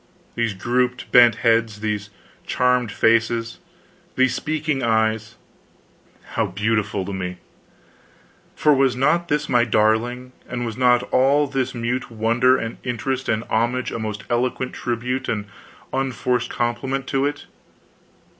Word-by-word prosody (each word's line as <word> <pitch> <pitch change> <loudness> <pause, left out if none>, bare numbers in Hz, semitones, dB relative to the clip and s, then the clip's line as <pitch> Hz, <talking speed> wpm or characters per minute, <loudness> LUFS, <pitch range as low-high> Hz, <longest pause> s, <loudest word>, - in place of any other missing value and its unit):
These 115 -3 -1
grouped 125 +4 -1
bent 120 -2 +7
heads, 115 -2 +2
these 105 -2 -2 0.4
charmed 125 -3 +1
faces, 115 +1 +1 0.6
these 130 -1 +3
speaking 155 0 -2
eyes 110 -1 0 1.0
how - - 0
beautiful 105 -2 -1
to 100 - -5
me! 90 -1 -4 1.2
For 150 - +4
was 135 -2 +2
not 155 +7 +2
this 150 -1 0
my 120 -2 +3
darling, 120 +3 +1 0.2
and 120 -1 -3
was 115 -2 -4
not 125 -1 +3
all 140 +3 +4
this 130 -2 -2
mute 120 +2 -2
wonder 120 +3 +3
and 115 0 -5
interest 130 +2 -2
and 110 0 0
homage 120 +3 -1
a - - -4
most 105 -2 -4
eloquent 125 +1 -1
tribute 125 +2 -3
and 105 -2 -2 0.5
unforced 130 -2 -1
compliment 125 +3 -2
to 135 +1 +1
it? 145 0 -5
120 Hz, 130 wpm, -22 LUFS, 110-130 Hz, 1.2 s, bent